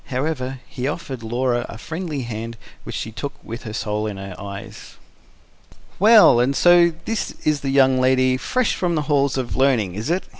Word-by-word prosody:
However 130 -1 -3
he 125 +1 -4
offered 140 -5 -5
Laura 120 +1 -1
a 110 - -8
friendly 160 +1 -5
hand 115 0 -6 0.3
which - - -6
she 110 - -4
took 140 +5 -5
with 115 +3 -8
her 110 - -6
soul 105 -1 -2
in 105 -2 -5
her 95 -1 -7
eyes. 100 -1 -9 1.0
"Well, 210 - +7
and 130 +3 +2
so 175 0 +5
this 225 -1 -3
is 150 -1 +2
the 140 - -3
young 130 -1 +4
lady 130 0 +3
fresh 245 - 0
from 175 -2 -1
the 155 - 0
halls 140 -2 +1
of 130 -2 -3
learning, 125 -9 +2
is 110 - -4
it?" 180 +3 0
130 Hz, 185 wpm, -21 LUFS, 115-150 Hz, 1.0 s, Well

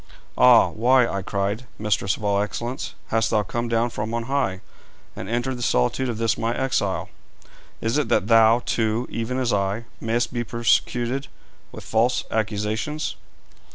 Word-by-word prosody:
'Ah! 125 -2 +6
why,' 125 +2 +4
I 100 - -3
cried, 100 +5 -2
'mistress 105 -3 0
of - - -11
all 100 -1 +2
excellence, 120 +4 -4
hast 115 0 +1
thou 105 -2 +2
come 120 +3 -3
down 115 +1 +1
from 110 +1 -4
on 115 - -2
high, 125 -8 -1 0.5
and 95 - -7
entered 120 +2 -2
the - - -7
solitude 115 - +1
of 115 - -3
this 115 0 0
my 115 +1 -1
exile? 125 -7 -1 0.7
Is 115 +6 +1
it 135 -7 -1
that 105 - +2
thou, 115 +2 +5
too, 115 +2 0
even 115 +3 -3
as 125 -3 0
I, 100 +3 -1
mayst 120 +2 -1
be 120 -1 -1
persecuted 120 +3 0 0.4
with - - -10
false 115 +3 +1
accusations?' 110 +7 -2
115 Hz, 160 wpm, -23 LUFS, 105-120 Hz, 0.7 s, Ah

